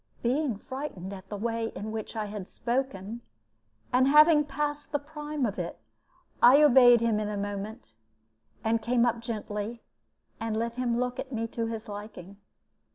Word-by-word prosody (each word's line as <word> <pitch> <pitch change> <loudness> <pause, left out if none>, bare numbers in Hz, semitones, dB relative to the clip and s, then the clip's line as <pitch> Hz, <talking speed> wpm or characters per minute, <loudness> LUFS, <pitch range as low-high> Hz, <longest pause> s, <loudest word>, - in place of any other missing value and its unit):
Being 255 -1 +1
frightened 210 -7 -6
at 190 0 -10
the 205 - -4
way 230 +1 -1
in 215 +1 -5
which 220 +1 -5
I 215 -1 -2
had 205 -2 -7
spoken, 235 -3 -3 0.7
and 255 +1 +5
having 300 +1 +7
passed 295 +1 -3
the 290 - +2
prime 295 -1 -4
of 200 -4 -3
it, 170 - -4 0.6
I 270 +5 +8
obeyed 245 -4 +7
him 230 -2 +2
in 210 -1 -2
a 210 - -3
moment, 205 +3 -5 0.7
and 225 +1 +1
came 235 +1 +2
up 235 -1 +1
gently 220 -1 -5 0.6
and 225 -1 -2
let 230 +1 -1
him 240 -1 -1
look 250 0 -2
at 265 - -5
me 230 -2 -2
to 230 0 -2
his 225 0 -5
liking. 205 -2 -9
230 Hz, 165 wpm, -28 LUFS, 210-260 Hz, 0.7 s, I